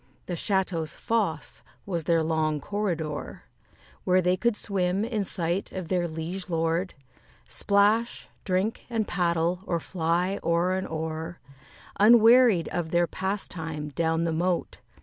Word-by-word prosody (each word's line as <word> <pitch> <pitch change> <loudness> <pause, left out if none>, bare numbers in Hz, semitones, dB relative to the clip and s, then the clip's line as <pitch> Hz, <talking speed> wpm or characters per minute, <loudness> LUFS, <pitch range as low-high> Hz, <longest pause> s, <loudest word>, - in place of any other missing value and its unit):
The 180 - -4
château's 175 -3 -1
fosse 205 -10 -2 0.2
was 170 -5 -3
their 165 -1 +3
long 155 -1 0
corridor, 170 -5 -3 0.6
Where 185 0 +3
they 180 0 +2
could 235 +3 +1
swim, 195 0 0
in 225 -3 -1
sight 175 0 -2
of 185 -3 -5
their 180 -2 +1
liege 170 +4 -5
lord, 165 +2 -1 0.5
Splash, 210 +3 +1 0.2
drink, 190 +3 -1
and 225 -3 -1
paddle, 170 0 0
or 170 - 0
fly 175 +3 -1
o'er 170 +2 +2
and 190 0 -2
o'er, 160 +1 -5 0.6
Unwearied 230 -3 +6
of 175 -2 -3
their 175 +1 +3
pastime, 165 -5 -3
down 165 +2 0
the 165 -1 0
moat. 175 +2 -1
175 Hz, 130 wpm, -26 LUFS, 165-195 Hz, 0.6 s, Unwearied